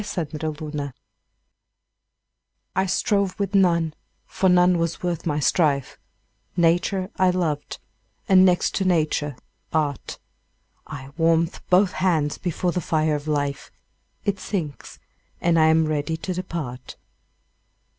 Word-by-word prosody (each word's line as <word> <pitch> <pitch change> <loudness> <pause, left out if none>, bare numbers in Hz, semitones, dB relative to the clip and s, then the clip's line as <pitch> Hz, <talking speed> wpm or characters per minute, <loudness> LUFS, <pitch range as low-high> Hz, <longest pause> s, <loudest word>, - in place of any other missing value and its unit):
9 185 -5 -3
Autoplay 150 -2 -5 1.8
I 190 +1 +1
strove 195 +1 0
with 200 -1 -2
none, 170 -5 +3 0.3
for 190 - +1
none 180 -1 +4
was 165 +1 -2
worth 175 -2 -2
my 150 -1 0
strife: 145 -2 +1 0.6
Nature 175 +3 +2
I 185 -1 +4
loved, 165 -5 -1 0.5
and, 185 -1 +7
next 180 -1 +3
to 195 - 0
Nature, 155 -5 +1 0.4
Art: 150 -4 -1 0.7
I 135 -3 -8
warm'd 165 +1 +2
both 185 +1 +4
hands 160 -6 0
before 175 0 -1
the 180 - -2
fire 155 -1 +1
of 150 0 -3
Life; 145 -2 -2 0.6
It 200 -2 0
sinks; 170 -8 -5 0.4
and 170 -1 +2
I 155 - +5
am 160 0 +4
ready 155 +1 -1
to 185 +3 -4
depart. 160 -9 -6
165 Hz, 125 wpm, -23 LUFS, 150-185 Hz, 1.8 s, and